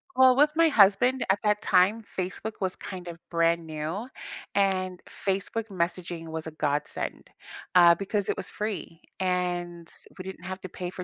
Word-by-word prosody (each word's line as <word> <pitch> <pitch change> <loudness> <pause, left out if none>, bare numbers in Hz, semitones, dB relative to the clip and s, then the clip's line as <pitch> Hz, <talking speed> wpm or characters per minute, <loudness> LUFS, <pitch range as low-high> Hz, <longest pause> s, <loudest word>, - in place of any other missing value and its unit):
Well, 260 -1 +7
with 295 +3 +5
my 330 0 +5
husband, 240 +2 +4
at 200 - +1
that 210 0 +2
time, 195 +4 +4
Facebook 190 +4 -3
was 185 -1 -1
kind 180 -2 -8
of 170 -1 -6
brand 170 0 +2
new, 160 +7 -4 0.5
and 185 -2 +1
Facebook 200 +3 -2
messaging 170 -2 -3
was 160 0 -5
a 160 - -5
godsend, 150 -1 -3 0.4
uh, 175 -1 +8
because 200 +2 -2
it - - 0
was 190 - -5
free, 205 -5 -5 0.2
and 175 -2 -1 0.3
we 185 - -6
didn't 190 -2 -8
have 190 +1 -6
to 185 - -7
pay 180 +1 -5
for 185 - -6
185 Hz, 170 wpm, -27 LUFS, 170-205 Hz, 0.5 s, uh